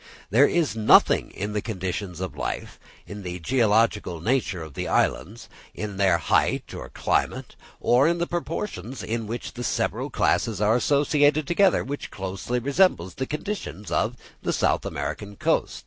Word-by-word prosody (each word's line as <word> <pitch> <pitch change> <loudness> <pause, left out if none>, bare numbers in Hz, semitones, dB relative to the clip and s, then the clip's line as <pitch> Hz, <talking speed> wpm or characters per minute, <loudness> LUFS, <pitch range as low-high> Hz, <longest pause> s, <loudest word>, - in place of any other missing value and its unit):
There 130 +7 +6
is 165 -8 0
nothing 110 -1 +5
in 105 +2 -5
the 105 - -1
conditions 95 -3 -4
of 95 - -4
life, - - -4 0.3
in 105 0 -8
the 90 -2 -5
geological 105 -3 +1
nature 95 -3 0
of 80 -3 -10
the - - -4
islands, - - 0 0.3
in 105 -2 -5
their 95 -3 +4
height - - +1
or - - -7
climate, - - -1 0.2
or 125 +5 +4
in 170 +1 +2
the 170 - 0
proportions 165 - -4
in 115 -1 -3
which 115 +2 -5
the 120 - -6
several - - -1
classes 110 -5 +1
are 105 +2 +3
associated 145 +3 +3
together, 185 +4 +3
which 145 +2 -5
closely 95 +5 -4
resembles 135 - +2
the 130 - -4
conditions 150 - -5
of 115 +3 0 0.3
the - - -1
South - - +1
American 80 +9 -5
coast. - - 0
110 Hz, 160 wpm, -25 LUFS, 95-140 Hz, 0.3 s, There